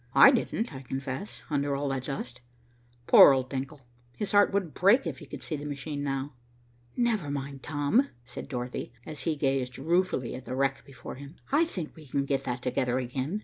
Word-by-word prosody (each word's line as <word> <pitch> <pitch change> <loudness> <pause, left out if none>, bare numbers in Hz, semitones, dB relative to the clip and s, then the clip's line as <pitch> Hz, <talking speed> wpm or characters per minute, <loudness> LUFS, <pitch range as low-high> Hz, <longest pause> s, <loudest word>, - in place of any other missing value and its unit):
I 275 - +10
didn't, 235 - -1
I 130 - -7
confess, 135 +6 -5
under 145 -1 +1
all 140 +1 -1
that 130 -1 -2
dust. 125 -3 -5 0.6
Poor 140 - +9
old 130 -1 -1
Denckel, 135 +2 -4 0.4
his 210 - -2
heart 205 0 +5
would 195 -6 -1
break 200 +6 +4
if 150 -6 -4
he - - -11
could 145 - -8
see 155 - -3
the 145 - -6
machine 145 0 -4
now." 135 0 -2 0.6
"Never 225 -10 +1
mind, 140 -1 -4
Tom," 150 - +1 0.2
said 120 - -8
Dorothy, 125 -2 -4
as 155 -2 -6
he 155 - +1
gazed 135 -3 0
ruefully 165 -4 +1
at 130 - -8
the 130 - -4
wreck 135 0 0
before 130 -3 -9
him. 140 +4 -10 0.2
"I 305 +4 +4
think 180 - -6
we 155 -2 -13
can 140 +1 0
get 140 -1 -1
that 125 0 -3
together 125 0 0
again. 130 +9 -2
140 Hz, 195 wpm, -28 LUFS, 130-160 Hz, 0.6 s, I